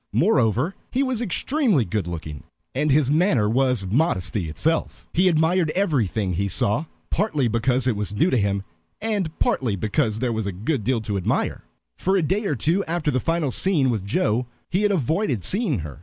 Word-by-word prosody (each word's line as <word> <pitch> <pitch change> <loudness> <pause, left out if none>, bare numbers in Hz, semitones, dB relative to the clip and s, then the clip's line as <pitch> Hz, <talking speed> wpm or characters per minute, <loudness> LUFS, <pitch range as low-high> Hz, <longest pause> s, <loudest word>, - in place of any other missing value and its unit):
Moreover, 135 - +2 0.2
he 265 +3 +1
was 255 -3 -1
extremely 235 - +1
good 100 -1 -2
looking, 80 -4 -6 0.3
and 150 +4 0
his 140 -1 +3
manner 150 - +3
was 125 -2 +1
modesty 95 - 0
itself. 155 - -1
He 185 +2 +3
admired 165 0 +2
everything 115 - 0
he 100 +4 0
saw, 105 - 0 0.3
partly 155 - +1
because 120 +3 +1
it 125 -4 +2
was 105 0 -3
new 165 - +2
to - - +3
him, 100 -2 0 0.4
and 210 -6 -1
partly 120 -6 +1
because 110 +2 0
there 120 0 -1
was 110 -2 -2
a - - -1
good 110 - -2
deal 120 +1 0
to 105 -2 -2
admire. 90 - -1 0.3
For 190 +1 +2
a 180 - +1
day 195 +8 0
or 150 - 0
two 170 - +1
after 165 -2 -1
the 130 - +1
final 165 -1 0
scene 150 -8 +2
with 110 -5 -2
Joe 110 +4 0 0.2
he 185 - +1
had 210 -1 +2
avoided 155 - 0
seeing 195 - 0
her. 75 -1 -8
130 Hz, 185 wpm, -23 LUFS, 105-170 Hz, 0.4 s, his